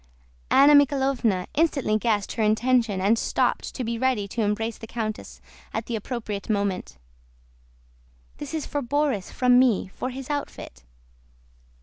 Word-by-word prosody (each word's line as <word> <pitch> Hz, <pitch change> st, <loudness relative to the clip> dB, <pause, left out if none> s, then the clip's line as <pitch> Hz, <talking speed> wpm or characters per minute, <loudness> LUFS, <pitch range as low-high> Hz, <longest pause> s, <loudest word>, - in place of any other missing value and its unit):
Anna 280 Hz, +2 st, +6 dB
Mikháylovna 265 Hz, -9 st, +2 dB
instantly 285 Hz, -8 st, +1 dB
guessed 210 Hz, -3 st, 0 dB
her 230 Hz, -, -3 dB
intention 220 Hz, -1 st, +2 dB
and 210 Hz, +4 st, +2 dB
stooped -, -, -1 dB
to 255 Hz, -, -3 dB
be 230 Hz, 0 st, -3 dB
ready 250 Hz, -6 st, 0 dB
to 230 Hz, -, -3 dB
embrace 220 Hz, +2 st, -1 dB
the 225 Hz, -, -9 dB
countess 220 Hz, -2 st, -5 dB, 0.3 s
at 220 Hz, -, -2 dB
the 235 Hz, -, -3 dB
appropriate 215 Hz, -2 st, -5 dB
moment. 200 Hz, -, -2 dB, 1.4 s
"This 290 Hz, +2 st, -6 dB
is 310 Hz, -, -3 dB
for 290 Hz, -, -3 dB
Borís 275 Hz, -6 st, -1 dB
from 250 Hz, -1 st, +4 dB
me, 240 Hz, -7 st, +2 dB
for 255 Hz, -, -5 dB
his 265 Hz, +2 st, -6 dB
outfit." 280 Hz, -, -6 dB
235 Hz, 140 wpm, -25 LUFS, 210-265 Hz, 1.4 s, Anna